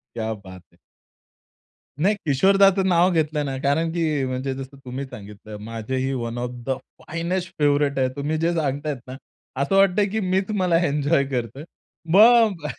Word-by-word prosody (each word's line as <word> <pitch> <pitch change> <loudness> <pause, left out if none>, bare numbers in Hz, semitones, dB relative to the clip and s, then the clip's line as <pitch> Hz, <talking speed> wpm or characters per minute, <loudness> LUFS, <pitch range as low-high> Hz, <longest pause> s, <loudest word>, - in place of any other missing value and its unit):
क्या 110 -1 -2
बात 95 -3 -12
है. - - -26 1.2
नाही, 205 +4 +3
किशोरदाचं 195 +6 +4
नाव 175 0 +4
घेतलं 155 -3 0
ना 135 -1 -3
कारण 160 +4 +1
की 155 -5 0
म्हणजे 130 +1 -3
जसं 135 +1 -9
तुम्ही 130 +2 -5
सांगितलं, 105 -3 -10
माझेही 115 +5 -3
one 120 -2 -4
of 125 0 -3 0.2
the 130 - 0 0.2
finest 170 +2 -3
favourite 145 -1 +2
आहे. 130 - +2
तुम्ही 150 +2 -2
जे 165 +2 0
सांगतायत 145 -2 -2
ना, 130 - -7 0.5
असं 165 +8 +1
वाटतंय 195 +1 +4
की 220 - -2
मीच 190 0 0
मला 175 -2 +3
एन्जॉय 145 0 +1
करतोय. 125 +2 -3 0.5
मग 215 -5 +5
अ, - - -2
145 Hz, 160 wpm, -23 LUFS, 130-175 Hz, 1.2 s, मग